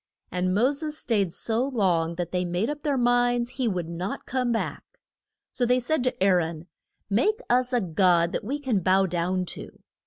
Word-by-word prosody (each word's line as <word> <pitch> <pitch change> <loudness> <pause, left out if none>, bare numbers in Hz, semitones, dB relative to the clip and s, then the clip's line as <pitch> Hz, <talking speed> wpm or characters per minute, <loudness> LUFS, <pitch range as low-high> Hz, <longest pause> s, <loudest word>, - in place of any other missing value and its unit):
And 180 0 0
Mo 245 +6 +3
ses 300 +1 -3
staid 205 - 0
so 225 +6 -1
long 180 -11 +1
that 175 -1 -4
they 180 0 0
made 180 +8 -1
up 295 0 -6
their 290 -3 0
minds 245 0 +2
he 255 -3 -2
would 180 -6 -2
not 175 +4 -5
come 250 -2 -1
back. 225 - -2 0.7
So 250 - -2
they 250 +1 +3
said 255 +2 0
to 250 -6 0
Aa - - +5
ron, 165 -1 -3 0.4
Make 405 - +1
us 250 +1 +3
a 245 -2 +2
God 175 -1 +3
that - - -3
we 265 +8 -2
can 260 -8 0
bow 190 +2 +3
down 180 +1 -1
to. - - -10
215 Hz, 195 wpm, -26 LUFS, 180-250 Hz, 0.7 s, Aa